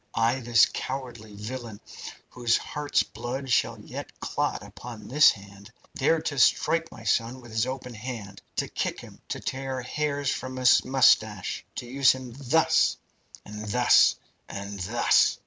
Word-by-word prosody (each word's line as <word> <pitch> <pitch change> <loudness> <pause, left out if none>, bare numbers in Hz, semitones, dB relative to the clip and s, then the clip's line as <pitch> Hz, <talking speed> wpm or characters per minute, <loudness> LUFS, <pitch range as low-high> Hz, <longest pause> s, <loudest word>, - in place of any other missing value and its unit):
Ay, 115 +3 +2
this 120 -2 +5
cowardly 120 -5 -6
villain, 110 0 -7 0.5
whose 120 -2 +1
heart's 150 -1 -1
blood 130 +3 -6
shall - - +1
yet - - -9
clot - - -2
upon 120 -2 -10
this 150 +5 +6
hand, 100 0 -8 0.2
dared 160 +4 +1
to 145 -4 -2
strike 165 +6 +3
my 115 - -12
son 115 +4 0
with 120 -2 -13
his 110 +2 0
open 130 -1 -5
hand, 110 -3 -7
to - - -1
kick - - -3
him, - - -13
to - - -3
tear 130 -1 -4
hairs 145 +1 -1
from 130 0 -5
his 130 -1 +5
moustache 110 -7 +2
to - - -5
use 130 +2 +4
him 130 -2 -8
thus 140 +4 +2 0.5
and 105 +1 -8
thus 120 +4 +5 0.3
and 100 0 -6
thus!" 110 +7 +3
125 Hz, 150 wpm, -26 LUFS, 110-135 Hz, 0.5 s, this